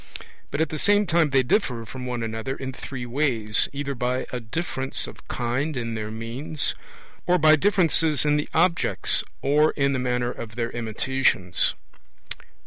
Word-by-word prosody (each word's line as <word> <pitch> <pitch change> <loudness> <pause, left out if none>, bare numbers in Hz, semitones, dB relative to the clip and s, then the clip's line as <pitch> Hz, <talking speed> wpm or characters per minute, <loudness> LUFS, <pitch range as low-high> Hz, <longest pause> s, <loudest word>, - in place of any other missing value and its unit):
But 145 - -2
at 160 - +1
the 155 - -4
same 205 0 +4
time 165 -3 +3
they 135 -1 +3
differ 125 - 0
from 125 +2 -7
one 120 -2 -3
another 110 +4 -3
in 130 -1 -6
three 125 -1 -6
ways, 120 -5 +1
either 140 0 -3
by 125 0 -1
a 125 - -3
difference 135 +2 -2
of - - -12
kind 130 +5 -2
in 115 -1 -3
their 110 -1 -4
means, 120 +7 -2 0.5
or 180 0 +4
by 155 -2 +6
differences 165 -4 +2
in 150 0 +3
the 150 - -1
objects, 170 +1 +2 0.2
or 150 +3 +3
in 140 -1 +1
the 130 - 0
manner 125 -1 0
of 115 -2 -8
their 115 -1 -2
imitations. 115 -5 0
130 Hz, 165 wpm, -24 LUFS, 120-150 Hz, 0.5 s, by